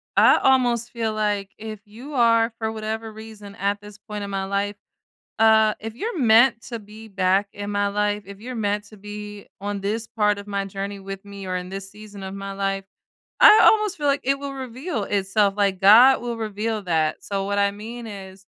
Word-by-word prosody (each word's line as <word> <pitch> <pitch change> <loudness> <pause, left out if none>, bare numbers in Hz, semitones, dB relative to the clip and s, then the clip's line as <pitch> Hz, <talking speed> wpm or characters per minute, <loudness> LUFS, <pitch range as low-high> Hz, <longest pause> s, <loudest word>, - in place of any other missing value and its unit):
I - - +6
almost 245 -3 +2
feel 225 -2 -2
like 205 -2 -1
if 215 -1 -7
you 235 +8 -11
are, 230 -2 +3
for 220 -1 -2
whatever 220 0 -4
reason, 215 -2 -11
at 200 +1 -1
this 205 0 -12
point 210 0 -7
in 200 - -5
my 195 -1 -2
life 200 +1 -2 0.7
uh, 220 -1 +5
if 225 0 -6
you're 420 - -4
meant 235 -1 +5
to 235 0 -7
be 215 +1 -13
back 195 0 +1
in 205 0 -5
my 205 0 +1
life, 205 0 -1
if 200 0 -11
you're 250 +3 -7
meant 210 -2 -1
to 210 +1 -16
be 210 0 -9
on 205 0 -4
this 215 +3 -2
part 210 -3 +1
of 200 - -9
my 200 -1 -2
journey 195 +1 -5
with 195 0 -8
me 200 -1 -9
or 185 0 -2
in 180 0 -5
this 195 0 -7
season 210 -1 -12
of 190 0 -6
my 195 0 -6
life, 195 0 -2 0.6
I 425 +1 +9
almost 425 -3 +4
feel 295 -2 -1
like 280 0 +2
it 275 +1 +1
will 280 0 -5
reveal 260 - -4
itself, 200 0 +1
like, 200 -2 +1
God 235 +7 +7
will 240 -1 -4
reveal 220 0 -3
that. 160 -4 0
So, 200 -1 -3
what 200 +1 -1
I 200 0 +3
mean 225 +3 -8
is, 195 -2 -10
210 Hz, 205 wpm, -23 LUFS, 200-225 Hz, 0.7 s, I